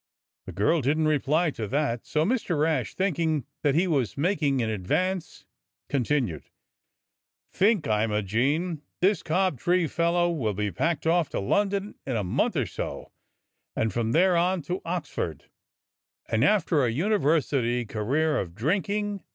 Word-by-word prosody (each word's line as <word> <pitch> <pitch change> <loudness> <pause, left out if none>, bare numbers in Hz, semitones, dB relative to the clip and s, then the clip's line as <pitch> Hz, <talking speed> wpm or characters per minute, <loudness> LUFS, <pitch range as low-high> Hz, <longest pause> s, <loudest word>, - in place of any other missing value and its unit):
The - - -5
girl 110 - +2
didn't 155 +4 +1
reply 155 +3 +2
to 110 -6 -5
that, 130 -2 -1
so 155 +1 +1
Mr. 200 - 0
Rash, 150 -6 0
thinking 160 - 0 0.2
that 145 -2 +2
he 175 +4 +3
was 140 - 0
making 150 -4 +1
an 115 - 0
advance, 180 - -2 0.4
continued: 125 - -1 1.0
"Think, 200 -3 +2
Imogene 115 - 0
— - - -56
this 190 0 +3
Cobtree 175 0 +1
fellow 170 +2 +1
will 115 - -1
be 105 0 -1
packed 160 - -1
off 165 -1 +2
to - - -3
London 200 - 0
in 130 - -1
a 105 - 0
month 135 - 0
or 135 -6 +1
so, 90 - -6 0.6
and 110 -1 0
from 115 -1 -1
there 180 +4 +4
on 175 0 +1
to 180 +5 -3
Oxford; 165 - -4 0.8
and 110 +2 +1
after 170 -5 +3
a 120 - +2
university 140 - +1
career 135 +9 0
of 85 -3 -5
drinking. 200 - -1
155 Hz, 145 wpm, -26 LUFS, 120-175 Hz, 1.0 s, there